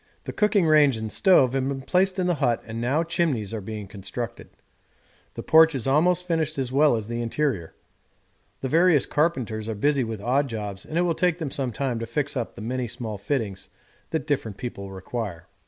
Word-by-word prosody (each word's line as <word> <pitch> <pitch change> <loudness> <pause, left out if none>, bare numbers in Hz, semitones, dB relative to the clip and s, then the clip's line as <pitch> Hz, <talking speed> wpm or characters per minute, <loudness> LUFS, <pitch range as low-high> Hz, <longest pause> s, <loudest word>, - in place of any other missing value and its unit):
The - - -6
cooking 210 -4 +2
range 150 -5 +5
and 110 -1 -5
stove 135 -10 +4
have 135 -1 0
been 135 -1 -4
placed 185 +4 +2
in 185 - 0
the 180 - +2
hut 120 -4 +1
and 115 0 -5
now 135 +7 +1
chimneys 160 - -1
are 110 - -3
being 105 +1 -6
constructed; 100 +5 -6 0.9
the - - -6
porch 160 -1 +6
is 130 - -3
almost 170 +6 +3
finished 160 -4 -1
as 130 -2 -2
well 145 -1 +4
as 110 -2 -4
the 120 0 -3
interior; 115 - -2 0.9
the 130 - -1
various 165 0 +4
carpenters 120 -9 -1
are 110 - -2
busy 140 +5 +2
with 110 -2 -4
odd 130 +6 +1
jobs 105 -4 -6
and 155 - -3
it - - +4
will 175 -1 +2
take 175 0 +1
them 160 -6 -4
some 135 -4 -1
time 125 0 -2
to 115 - -4
fix 140 +4 -2
up 120 -3 -3
the 115 - -9
many 125 +2 -2
small 110 -3 -5
fittings 100 -4 -3 0.4
that 160 - -2
different 130 -9 -2
people 100 -5 -6
require. 95 -2 -5
130 Hz, 205 wpm, -25 LUFS, 110-155 Hz, 0.9 s, porch